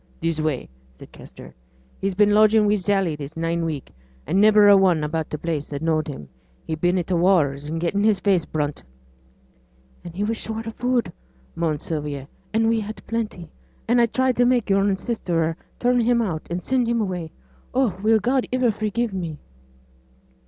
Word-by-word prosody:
'This 165 -1 -1
way,' 155 -5 -2 0.3
said - - -14
Kester. - - -13 0.5
'He's 195 -1 -2
been 205 +1 +4
lodgin' 215 0 +5
wi' 205 - +3
Sally 195 -4 +1
this 150 +2 -8
nine 165 +1 -1
week, 155 -4 -4 0.3
an' 190 +4 +2
niver 210 -1 +6
a 205 - +8
one 185 -5 +3
about 155 +1 -2
t' 150 - -4
place 155 -2 -3
as 140 - -3
knowed 160 -1 0
him; 135 - -7 0.4
he's 160 -1 -4
been 175 +2 +2
i' 180 - 0
t' 185 - -3
wars 155 -6 +2
an' 160 - -3
getten 175 +5 0
his 215 -2 +3
face 190 -5 +2
brunt.' 150 -2 -3 1.2
'And 170 -1 -9
he 200 - -1
was 225 +2 -1
short 225 0 -5
o' 225 - -4
food,' 245 +1 -1 0.4
moaned 160 -3 -1
Sylvia, 145 -4 -4 0.2
'and 225 +1 +2
we 225 0 +2
had 215 +1 -7
plenty, 215 -8 -4 0.4
and 240 +1 +4
I 235 - +4
tried 260 +2 0
to 245 - +4
make 245 -4 +2
yo'r 195 0 +3
sister 170 -7 -1 0.2
turn 245 0 +2
him 235 +1 +2
out, 180 -9 -2
and 175 +1 -3
send 255 -2 +1
him 235 0 +1
away. 180 -6 -3 0.4
Oh! 250 -7 +1
will 220 +1 +4
God 250 +5 0
iver 250 -2 +2
forgive 215 +1 -2
me?' 170 -5 -4
195 Hz, 190 wpm, -23 LUFS, 160-225 Hz, 1.2 s, a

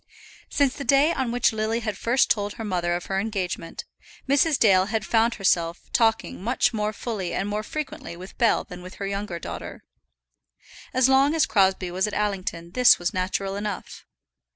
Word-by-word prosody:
Since 280 -3 +1
the 280 - -4
day 275 +6 +4
on 260 -6 -2
which 245 -1 +2
Lily 220 +2 -1
had 215 -2 -3
first 245 +3 +2
told 205 -1 0
her 225 - -7
mother 175 -4 -1
of 175 - -5
her 195 0 -1
engagement, 195 -5 -4 0.4
Mrs. 285 +2 +3
Dale 190 -4 +5
had 215 0 -2
found 230 +1 +2
herself 170 -3 0
talking 225 -5 +1
much 245 +2 +1
more 210 -1 -1
fully 210 -4 -4
and 195 - -1
more 210 +1 -2
frequently 300 - -6
with 185 +2 -11
Bell 235 -2 +3
than 180 0 -10
with 185 +1 -10
her 200 - -5
younger 200 -2 -3
daughter. - - -7 1.1
As 255 0 +3
long 270 +3 +4
as 320 - +3
Crosbie 190 -3 +2
was 185 +3 0
at 210 - -5
Allington 185 -5 -2
this 250 +4 +6
was 175 0 -2
natural 195 +1 -2
enough. 205 -1 -6
210 Hz, 180 wpm, -24 LUFS, 185-240 Hz, 1.1 s, this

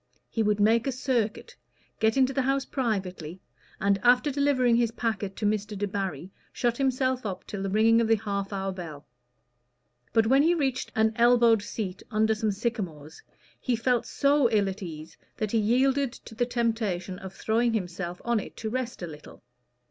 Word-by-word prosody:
He 225 - 0
would 210 -1 +1
make 225 +4 +3
a - - +1
circuit, 255 - -2 0.4
get 220 +3 +2
into 265 0 +3
the 270 - +1
house 270 +1 0
privately, 190 - -3 0.4
and 200 0 +2
after 250 +4 +4
delivering 265 -4 +2
his 235 -1 +2
packet 215 -4 -3
to 215 - -3
Mr. 210 0 -1
Debarry, 195 -4 -3 0.2
shut 240 -1 0
himself 260 -1 0
up 195 -4 -5
till 200 - -6
the 195 - -2
ringing 225 +3 +4
of 230 - +1
the 225 - +5
half 200 -2 -3
hour 195 -1 -2
bell. 165 -6 -8 1.1
But 225 0 +3
when 265 +5 +5
he 335 +4 +3
reached 265 -5 -1
an 220 0 +3
elbowed 235 -2 +5
seat 200 -2 -5
under 220 -1 +2
some 215 0 -1
sycamores, 195 -9 -4 0.4
he 250 - 0
felt 240 +1 0
so 280 -3 +3
ill 210 -3 +2
at 190 +2 -7
ease 160 -3 -8 0.2
that 215 -2 -2
he 230 - +2
yielded 260 +4 +2
to 230 - -13
the 240 +2 0
temptation 220 -7 -1
of 190 -1 -8
throwing 230 +2 +1
himself 180 -3 -3
on 235 -1 +2
it - - -9
to 220 -1 -4
rest 250 -5 -3
a - - -3
little. 150 -2 -12
220 Hz, 180 wpm, -27 LUFS, 195-245 Hz, 1.1 s, the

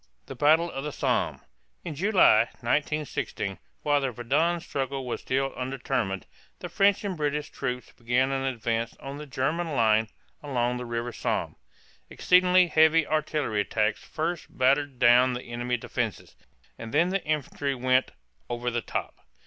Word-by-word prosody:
THE - - -8
BATTLE 160 +4 +3
OF 135 - -5
THE 150 - -3
SOMME. - - -1 0.4
In 165 - -4
July, 180 - +5 0.2
1916, 135 - -2 0.2
while 145 -1 +2
the 135 - 0
Verdun 145 +9 0
struggle 135 -5 -4
was 125 - -4
still 135 +1 -1
undetermined, 125 -7 -2 0.3
the - - -7
French 200 0 +3
and 200 -3 -2
British 150 -1 -2
troops 125 -2 -4
began 125 +3 0
an 135 0 -1
advance 115 -3 -2
on 140 +1 -8
the 150 - -8
German 155 +5 -1
line 110 -2 +3 0.3
along 125 -4 -1
the 125 0 -6
river 120 +1 -3
Somme - - -2
(som). - - -26 0.5
Exceedingly 180 0 +4
heavy 160 -1 +4
artillery 150 -8 0
attacks 105 +1 -1
first 165 +2 -3
battered 135 +1 +1
down 125 +1 +5
the 125 - -5
enemy 120 +1 -2
defenses, - - -4 0.4
and 115 - -7
then 175 +2 +4
the 195 +1 -1
infantry 145 -2 -2
went 130 +1 +2 0.4
"over 120 0 -2
the 120 0 -1
top." - - -5
135 Hz, 155 wpm, -27 LUFS, 120-155 Hz, 0.5 s, July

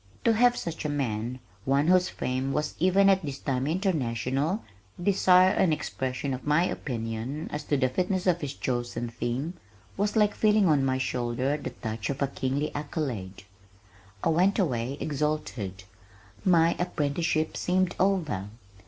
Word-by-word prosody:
To 230 - +4
have 245 +2 +4
such 165 -1 -4
a 150 - -1
man, 125 -4 -2 0.3
one 140 +4 +2
whose 180 0 +4
fame 130 +2 -2
was 150 0 -1
even 185 +3 +4
at 195 -1 +5
this 140 -3 -5
time 135 -1 -1
international, 150 - 0 0.4
desire 185 0 +5
an 180 - +2
expression 135 -3 -2
of 130 +3 -6
my 150 +3 +4
opinion 120 +2 -4
as 150 0 -3
to 145 - +1
the 130 -1 +2
fitness 180 +7 -1
of 175 -2 +2
his 145 -2 -4
chosen 120 -1 -2
theme, 120 +7 -3 0.4
was 205 +2 0
like 210 -1 +4
feeling 210 -2 +3
on 145 -4 +3
my 130 -1 +1
shoulder 125 +1 -1
the 150 - -5
touch 110 -1 -5
of 140 -1 -3
a - - +2
kingly 135 +2 -2
accolade. 130 - -4 0.8
I - - +2
went 180 +5 +3
away, 130 - 0
exalted. 140 -10 -2 0.6
My 170 -2 +4
apprenticeship 155 -1 0
seemed 185 0 +1
over! 165 - +1
145 Hz, 155 wpm, -27 LUFS, 130-180 Hz, 0.8 s, at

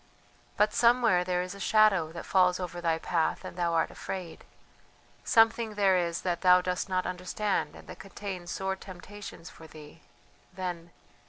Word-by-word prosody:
"But 210 +1 +3
somewhere 235 -6 +4
there 180 0 -1
is 180 +1 -7
a 200 - -11
shadow 195 -5 +3
that 170 - -8
falls 180 -1 +3
over 175 -1 -5
thy 165 -1 +1
path 165 0 -1
and - - -8
thou 175 -1 0
art 165 - +1
afraid 180 -3 -7 0.8
something 225 -1 +3
there 195 -2 +3
is 170 -2 -1
that 175 -2 -2
thou 180 -1 +6
dost 180 +1 -2
not 185 -1 0
understand 185 +3 -2
and - - -14
that - - -10
contains 195 -3 -7
sore 190 +1 -2
temptations 190 -1 -10
for 160 - -14
thee... 150 -1 -14 0.5
then.... 175 -2 -5
180 Hz, 165 wpm, -29 LUFS, 175-200 Hz, 0.8 s, thou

